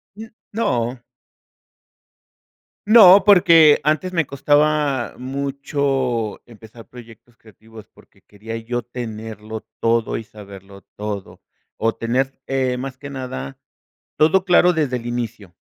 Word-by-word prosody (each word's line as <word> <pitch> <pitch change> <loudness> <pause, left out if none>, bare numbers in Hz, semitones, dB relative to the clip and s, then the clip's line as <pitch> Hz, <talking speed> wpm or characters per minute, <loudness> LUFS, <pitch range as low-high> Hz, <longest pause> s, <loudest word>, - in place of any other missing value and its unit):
N 220 +1 -11 0.2
no. 125 - -1 1.9
No, 200 -4 +8
porque 165 -6 +6
antes 155 +5 0
me 165 -3 +1
costaba 145 -1 +1
mucho 135 -3 -2
empezar 115 0 -15
proyectos 120 -1 -15
creativos, 110 0 -16
porque - - -23
quería 110 +2 -9
yo 120 +2 -4
tenerlo 110 -2 -8
todo 115 0 +1
y 115 - -4
saberlo 100 -2 -14
todo. 105 -2 -7 0.3
O 115 0 -1
tener, 130 +4 -2
eh, 130 -2 -1
más 130 0 -6
que 145 +1 -9
nada, 125 - -7 0.6
todo 165 +5 +3
claro 180 -1 +4
desde 145 -6 -1
el 120 - -10
inicio. 120 -6 -5
125 Hz, 115 wpm, -20 LUFS, 110-145 Hz, 1.9 s, No